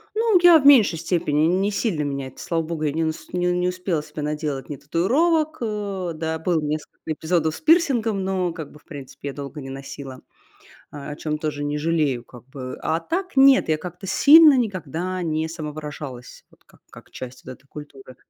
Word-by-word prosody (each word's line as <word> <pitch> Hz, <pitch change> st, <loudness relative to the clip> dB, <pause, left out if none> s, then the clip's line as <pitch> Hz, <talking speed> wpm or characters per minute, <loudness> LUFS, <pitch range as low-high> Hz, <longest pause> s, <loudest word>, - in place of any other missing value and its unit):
Ну, 445 Hz, -3 st, +4 dB
я 350 Hz, -2 st, +8 dB
в 280 Hz, -, -1 dB
меньшей 225 Hz, -, +6 dB
степени, 155 Hz, -3 st, +1 dB
не 190 Hz, +4 st, +1 dB
сильно 200 Hz, -6 st, -1 dB
меня 140 Hz, -2 st, -3 dB
это, 130 Hz, -, -15 dB
слава 165 Hz, -2 st, -1 dB
богу, 160 Hz, -1 st, -4 dB
я 150 Hz, -, 0 dB
не 160 Hz, +2 st, -1 dB
нас 160 Hz, 0 st, -4 dB
не 180 Hz, 0 st, 0 dB
не 180 Hz, 0 st, 0 dB
успела 180 Hz, -3 st, -2 dB
себе 150 Hz, 0 st, -8 dB
наделать 150 Hz, -3 st, -3 dB
ни 145 Hz, -, -5 dB
татуировок. 305 Hz, -, +1 dB
Э, 200 Hz, -5 st, -3 dB
да, 160 Hz, 0 st, -3 dB
было 165 Hz, 0 st, 0 dB
несколько 150 Hz, 0 st, -4 dB
эпизодов 160 Hz, 0 st, 0 dB
с -, -, -9 dB
пирсингом, 255 Hz, -, +2 dB
но 185 Hz, -2 st, -1 dB
как 160 Hz, -3 st, -8 dB
бы, 150 Hz, -, -15 dB
в -, -, -29 dB
принципе, 140 Hz, -1 st, -9 dB
я 140 Hz, -, -6 dB
долго 140 Hz, +2 st, -7 dB
не 135 Hz, -1 st, -8 dB
носила, 135 Hz, -1 st, -8 dB, 0.7 s
а, 145 Hz, 0 st, -8 dB
о 145 Hz, -, -6 dB
чём 150 Hz, -1 st, -3 dB
тоже 150 Hz, -1 st, -3 dB
не 145 Hz, 0 st, -2 dB
жалею 150 Hz, -6 st, 0 dB
как 120 Hz, 0 st, -15 dB
бы. 130 Hz, -1 st, -7 dB
А 160 Hz, +1 st, 0 dB
так 365 Hz, -, -4 dB
нет, 270 Hz, -5 st, +6 dB
я 155 Hz, -1 st, +1 dB
как-то 180 Hz, +3 st, -8 dB
сильно 290 Hz, -, +7 dB
никогда 185 Hz, -, -3 dB
не 160 Hz, -1 st, -1 dB
самовыражалась 150 Hz, -5 st, -8 dB
вот -, -, -26 dB
как -, -, -24 dB
как -, -, -15 dB
часть 130 Hz, 0 st, -9 dB
вот 130 Hz, -, -7 dB
этой 135 Hz, -, -18 dB
культуры. 135 Hz, -3 st, -12 dB
160 Hz, 200 wpm, -23 LUFS, 145-190 Hz, 0.7 s, я